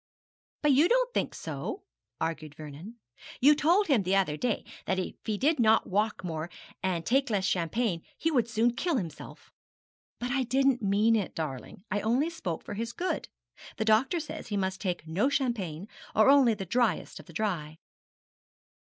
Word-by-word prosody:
'But 295 - +5
you 295 +6 +5
don't - - +2
think - - -1
so,' 390 - -5 0.4
argued 155 -2 -3
Vernon. 155 +8 -9 0.4
'You 290 +4 +7
told 340 +7 +3
him 275 - +3
the 190 +1 +1
other 185 -6 +2
day 240 +6 -1 0.2
that 190 - +1
if 185 - -2
he 215 -2 -1
did 300 +6 +2
not 220 -1 +4
walk 210 +1 0
more, 165 -1 -4 0.3
and 180 -3 -1
take 270 +2 +2
less 200 -3 0
champagne, 180 +1 0 0.2
he 325 - 0
would 245 -6 +2
soon 235 +1 +2
kill 335 +4 0
himself.' 165 -9 -7 0.7
'But 245 +1 -3
I 270 0 +1
didn't 265 0 +2
mean 210 +3 +3
it, 205 -4 -2
darling. 155 +2 -5
I 205 - 0
only 255 +10 +1
spoke 180 - -4
for - - -6
his 230 +3 -4
good. 370 - -2 0.5
The 220 - -1
doctor 230 +10 +3
says 310 - -7
he 205 -3 -2
must 190 -1 -2
take 180 -5 -2
no 195 - +1
champagne, 210 - -2 0.3
or 220 +5 +6
only 265 -5 +5
the 195 -2 -5
dryest 230 -1 0
of - - -13
the 170 - -13
dry.' 165 -6 -2
220 Hz, 180 wpm, -29 LUFS, 180-265 Hz, 0.7 s, You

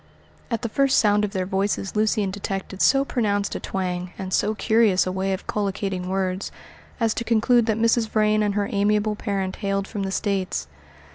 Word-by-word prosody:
At 230 -1 -2
the - - 0
first 275 +3 +2
sound 210 -1 +4
of 210 - 0
their 190 -2 -2
voices 195 +1 -1
Lucian 210 -2 +1
detected 195 -1 -5
so 275 0 +4
pronounced 205 -6 0
a - - -3
twang, 180 -1 -3
and 190 -1 -5
so 215 +1 +1
curious 220 -3 +3
a 185 - -2
way 190 +1 -1
of 190 - -3
collocating 195 -2 -2
words, 190 0 -2 0.5
as 225 -2 +2
to - - -3
conclude 235 +1 +3
that 220 -1 +1
Mrs. 230 0 +2
Vrain 215 0 +2
and 205 -1 0
her 205 -1 0
amiable 210 0 +1
parent 195 -2 -3
hailed 195 0 -1
from 205 - -5
the 195 - -2
States. 190 - -1
205 Hz, 190 wpm, -23 LUFS, 190-215 Hz, 0.5 s, sound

